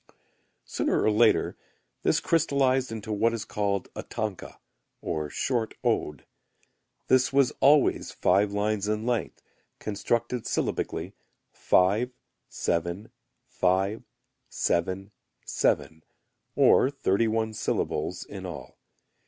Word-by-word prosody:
Sooner - - 0
or 110 - +3
later 110 +2 +3 0.5
this - - +2
crystallized 135 -5 +1
into 110 -1 -4
what 115 +3 +2
is 110 -3 -4
called 100 -2 -1
a - - -4
tanka 105 -4 -5 0.4
or 75 -2 -3
short 115 - -1
ode. 75 - -1 0.8
This 130 0 +3
was 135 -1 +3
always 145 +1 +4
five 100 +3 +2
lines 105 0 -1
in 110 +1 -1
length, 120 -2 -2 0.3
constructed 115 +3 -2
syllabically - - -2 0.4
5, 105 +7 +2 0.4
7, 85 +6 -2 0.3
5, 95 0 0 0.5
7, 95 +4 -1 0.3
7, 80 0 0 0.5
or 130 - +5
thirty 115 -6 +1
one 110 0 -1
syllables 110 +1 -2
in - - -8
all. - - -9
110 Hz, 105 wpm, -27 LUFS, 95-120 Hz, 0.8 s, or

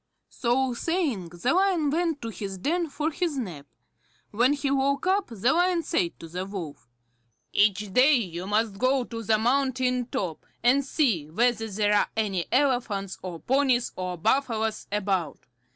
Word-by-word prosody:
So 255 +1 0
saying, 270 - -1
the 175 - -1
Lion 360 -6 +2
went 325 -3 -1
into - - -3
his 200 -3 -6
den 330 - -1
for 300 +3 -2
his 325 -2 -2
nap. 170 - -5 0.6
When 245 +6 +3
he 280 -1 -1
woke 275 +2 +1
up, 385 +1 +2
the 235 +1 +1
Lion 350 0 +2
said 170 - -1
to 165 - -9
the 180 +3 -4
Wolf: 180 -10 -7 0.6
"Each 205 -1 +2
day 265 +7 +6
you 185 -6 -3
must 210 -1 0
go 255 +1 +2
to 230 -1 -7
the 220 0 +2
mountain 255 +1 +1
top, 175 -10 -4 0.2
and 260 +4 +4
see 235 - 0
whether 225 +4 +1
there 205 +1 +1
are 205 - +3
any 195 -5 -1
elephants, 245 -8 0
or 175 -3 -7
ponies, 260 -2 +2
or 180 -1 -4
buffaloes 225 +1 0
about. 190 -7 -1
235 Hz, 160 wpm, -26 LUFS, 195-275 Hz, 0.6 s, day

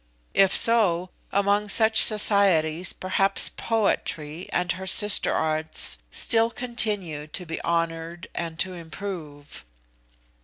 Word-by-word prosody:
If 195 -1 +3
so, 185 -6 +3 0.2
among 200 +1 0
such 220 +1 +4
societies 185 -6 +3
perhaps 190 +1 +3
Poetry 175 -7 -3
and 175 0 -1
her 190 +1 -6
sister 210 +2 +1
arts 155 0 -2
still 225 -1 +1
continue 210 -11 -2
to 180 +4 -6
be 165 -1 -6
honoured 165 0 -3
and 165 -1 -5
to 185 +2 -2
improve?" 160 - -9
185 Hz, 110 wpm, -24 LUFS, 165-205 Hz, 0.2 s, such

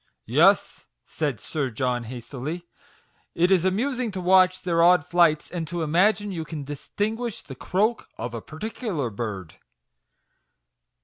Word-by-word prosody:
" - - -54
Yes," - - +3 0.2
said 145 -8 -3
Sir 140 +4 -2
John, 125 0 -1
hastily; 130 +8 -6 0.2
' - - -33
' - - -40 0.2
it 175 +3 +3
is 185 -3 +4
amus 240 +8 0
ing 245 -3 -1
to 185 - -4
watch 185 0 +4
their 170 -2 +2
odd 175 -3 +5
flights, 170 -3 +3
and 170 -3 -4
to 170 +1 -3
imagine 200 +6 +2
you 165 -4 -4
can 155 -2 -6
distinguish 210 - -4
the 135 - -9
croak 210 - -1
of 120 +1 -5
a 115 - -5
particular 160 - -4
bird." 100 -6 -6
170 Hz, 160 wpm, -25 LUFS, 135-190 Hz, 0.2 s, odd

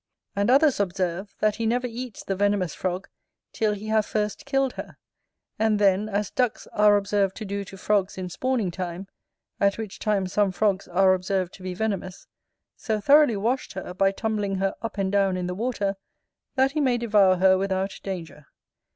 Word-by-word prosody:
And 200 +3 +1
others 280 0 +4
observe, 190 0 -2
that 215 -1 +2
he 230 -1 -1
never 245 +2 +1
eats 245 -2 -6
the 195 - -2
venomous 200 -3 +1
frog 185 +1 -3 0.5
till 215 -1 +1
he 205 +1 -7
have 220 0 +3
first 210 +4 -3
killed 270 -1 +1
her, - - -8 0.6
and 220 -1 +3
then 200 +1 +2
as 205 -1 -1
ducks 250 -3 0
are 210 0 +5
observed 200 -1 0
to 220 - -6
do 200 0 -3
to 195 - -11
frogs 200 0 0
in 185 -1 -4
spawning 230 0 -1
time, 180 +1 -5 0.5
at 200 0 +2
which 220 -3 -6
time 205 -3 +1
some 200 +1 +1
frogs 195 0 0
are 185 +1 +4
observed 185 0 -1
to - - -13
be 185 -1 -5
venomous, 195 -3 -3 0.5
so 215 -2 -2
thoroughly 280 0 +5
washed 240 +6 -1
her, 185 -1 -6
by 195 +1 +2
tumbling 205 -1 -2
her 195 0 0
up 225 -2 -5
and 195 -1 0
down 195 -2 +2
in 180 - -2
the 180 - -3
water, 205 -1 -1 0.6
that 265 0 +3
he 305 +1 -1
may 255 -3 +2
devour 210 -5 +4
her 190 +1 +5
without 190 0 -2
danger. 165 -7 -7
200 Hz, 185 wpm, -25 LUFS, 190-220 Hz, 0.6 s, are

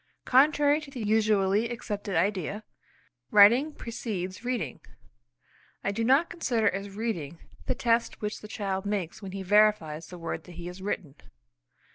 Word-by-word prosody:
Contrary 290 +3 +4
to 295 - -10
the 270 -3 -8
usually 210 0 +2
accepted 205 -4 -4
idea, 195 +3 0 0.7
writing 230 +9 +6
precedes 205 -7 -5
reading. 240 - -3 1.0
I 200 - 0
do 225 +3 -2
not 270 +8 +4
consider 240 -11 0
as 195 +1 -1
reading 175 -9 -3 0.3
the - - 0
test 235 0 +1
which 210 0 -4
the 210 - -10
child 195 -3 -3
makes 200 -4 -3
when 190 -2 -7
he 195 -1 -4
verifies 190 -6 +3
the 180 - -10
word 165 -1 -5
that 180 - -12
he 170 0 -8
has 180 +2 -8
written. 180 -7 -4
205 Hz, 150 wpm, -28 LUFS, 185-230 Hz, 1.0 s, writing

